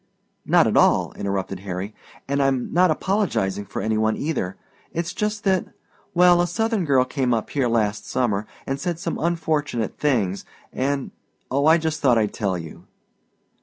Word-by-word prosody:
"Not - - +5
at - - +1
all," - - +4
interrupted 95 -1 -3
Harry, 95 +2 -5 0.3
"and 140 +1 0
I'm 135 -2 0
not 180 +1 +5
apologizing 155 - 0
for - - -4
any 110 0 0
one 110 0 +1
either. 140 - -2 0.3
It's 170 +1 -3
just 210 0 -2
that 190 -3 +2 0.5
well, 175 0 +6
a 175 - +1
Southern 225 0 0
girl 135 -3 +3
came 130 -2 0
up 110 - -4
here 135 -4 +1
last 110 -3 0
summer 110 -5 0 0.2
and 135 +1 -2
said 175 0 -2
some 170 0 -3
unfortunate 155 -8 -1
things, 105 -10 +1 0.3
and 140 +1 -1 0.4
oh, 140 +3 +2
I 160 +1 +7
just 160 -1 -2
thought 125 -4 +4
I'd 105 -2 +1
tell 95 -4 -1
you." 80 -2 -10
135 Hz, 165 wpm, -23 LUFS, 105-170 Hz, 0.5 s, I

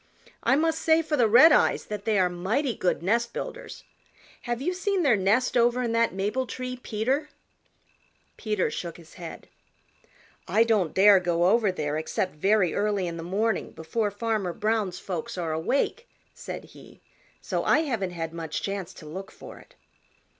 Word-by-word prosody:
I 265 - +3
must 320 +2 +1
say 320 0 +3
for 310 -1 -1
the 240 -5 +3
Redeyes 300 +9 +6
that 210 -1 -6
they 220 -2 +2
are 185 -1 +4
mighty 200 +10 -1
good 180 -4 -1
nest 235 +5 +1
builders. - - -7 0.6
Have 240 -1 -2
you 355 +7 -1
seen 380 0 0
their 270 -7 +4
nest 205 +6 +1
over 240 +1 +3
in 235 - -1
that 230 0 +2
maple 210 +7 -2
tree, 255 0 -5
Peter?" 255 +6 -2 1.1
Peter 210 -7 -1
shook 170 0 -5
his 165 -2 -16
head. 170 -2 -9 1.0
"I 215 +6 +4
don't 215 -8 +1
dare 195 0 +7
go 175 -1 +1
over 210 +1 +3
there 150 -4 -2
except 185 +3 -2
very 190 +2 +2
early 205 -2 0
in 170 -1 -4
the - - -5
morning 200 +5 -1
before 205 +7 -2
Farmer 205 -3 -2
Brown's 215 -3 -1
folks 180 -1 -5
are 170 -3 -2
awake," 275 - -1 0.3
said - - -7
he, - - -15 0.4
"so - - -2
I - - +4
haven't 230 - -2
had 165 -2 -5
much 165 -2 -5
chance 195 -3 -4
to - - -12
look 190 +6 -7
for - - -12
it." - - -20
210 Hz, 170 wpm, -26 LUFS, 180-240 Hz, 1.1 s, dare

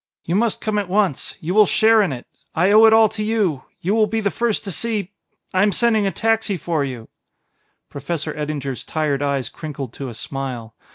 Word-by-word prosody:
You 170 - -3
must 225 +1 +1
come 215 -1 0
at 200 -3 -4
once. 195 -7 0
You 170 +3 -2
will 210 -1 +6
share 220 0 +4
in 190 -7 +1
it; 125 -2 -6 0.3
I 180 +5 +3
owe 215 +2 +8
it 220 - +7
all 220 0 +6
to 215 0 -4
you... 205 -11 0 0.2
you 190 +4 0
will 220 -1 +3
be 225 +2 -1
the 200 -2 0
first 230 +3 -1
to 200 - -5
see... 210 0 -2 0.4
I 185 - +3
am 205 0 +4
sending 220 -1 +2
a - - 0
taxi 225 -3 0
for 160 -2 -1
you 125 -5 -6 0.4
" - - -47
Professor 150 +2 -4
Eddinger's 145 -3 -4
tired 150 -3 -1
eyes 140 -4 -1
crinkled 140 -5 -7
to 135 -2 -6
a 120 - -9
smile. 125 -3 -5
185 Hz, 215 wpm, -21 LUFS, 140-215 Hz, 0.4 s, owe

